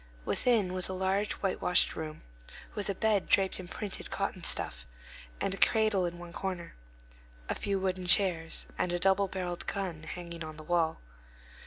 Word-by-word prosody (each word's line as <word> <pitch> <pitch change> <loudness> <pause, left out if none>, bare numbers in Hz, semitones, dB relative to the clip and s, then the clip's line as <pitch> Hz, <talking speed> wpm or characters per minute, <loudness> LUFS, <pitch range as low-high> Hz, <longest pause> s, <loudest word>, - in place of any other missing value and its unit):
Within 215 -7 +2
was 185 0 -1
a - - -2
large 190 +2 +1
whitewashed 185 -2 +3
room, 155 -1 -6 0.5
with 205 -1 -3
a 200 - 0
bed 210 -1 +2
draped 190 -1 +3
in 180 - -7
printed 200 +2 -5
cotton - - -2
stuff, - - +2 0.5
and 195 - 0
a - - -4
cradle 215 -5 +4
in 175 0 -6
one 175 0 -10
corner, 185 -3 -4 0.7
a - - 0
few 200 -1 -1
wooden 185 -1 -2
chairs, 175 -4 +3
and 180 - +1
a 175 - +1
double 195 +2 +3
barrelled 180 -2 -4
gun 185 -6 -3
hanging 170 +1 -7
on 155 -1 -8
the 155 - -9
wall. 165 -1 +1
185 Hz, 170 wpm, -31 LUFS, 170-195 Hz, 0.7 s, cradle